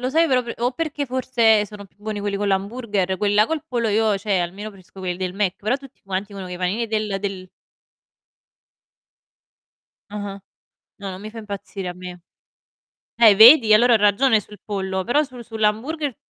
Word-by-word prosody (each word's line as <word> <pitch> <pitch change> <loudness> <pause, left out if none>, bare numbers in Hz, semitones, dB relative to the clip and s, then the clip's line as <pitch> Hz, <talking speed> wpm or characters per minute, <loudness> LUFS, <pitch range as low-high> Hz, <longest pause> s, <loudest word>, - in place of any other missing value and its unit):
lo 250 - -1
sai 325 +3 +3
però 255 -3 +2
p 235 - -6
o 245 +2 0
perché 295 0 -3
forse 235 -5 +2
sono 205 0 -11
più 195 - -23
buoni 210 0 -5
quelli 200 -1 -2
con 205 0 -1
l'hamburger, 200 -1 -1
quelli 205 -1 +1
là 210 - +5
col 320 -1 -3
pollo 235 -3 -1
io, 215 -1 +2
cioè 195 -1 -1
almeno 195 +5 -5
preferisco 190 -1 -15
quelli 180 -1 -3
del 185 0 -3
Mc, 195 -2 -1
però 215 +6 0
tutti 275 -1 -16
quanti 195 +1 -4
dicono 195 -2 -7
che 180 - -7
i - - -6
panini 190 +6 -1
del 215 -3 -2
del 190 -2 -5 2.6
Ah-ah. 205 -1 -6 0.6
No, 200 -1 -6
non 185 +1 -8
mi 215 - -7
fa 225 - -8
impazzire 200 -2 -7
a 180 - -4
me. 180 -1 -10 0.9
Eh 225 -4 +6
vedi? 225 0 +8
Allora 240 +2 +5
ho - - +7
ragione 215 +3 +3
sul 210 +1 -13
pollo, 190 -2 -3
però 290 +9 +2
sul 250 -4 -10
sull'hamburger 230 +6 -2
210 Hz, 190 wpm, -22 LUFS, 195-235 Hz, 2.6 s, vedi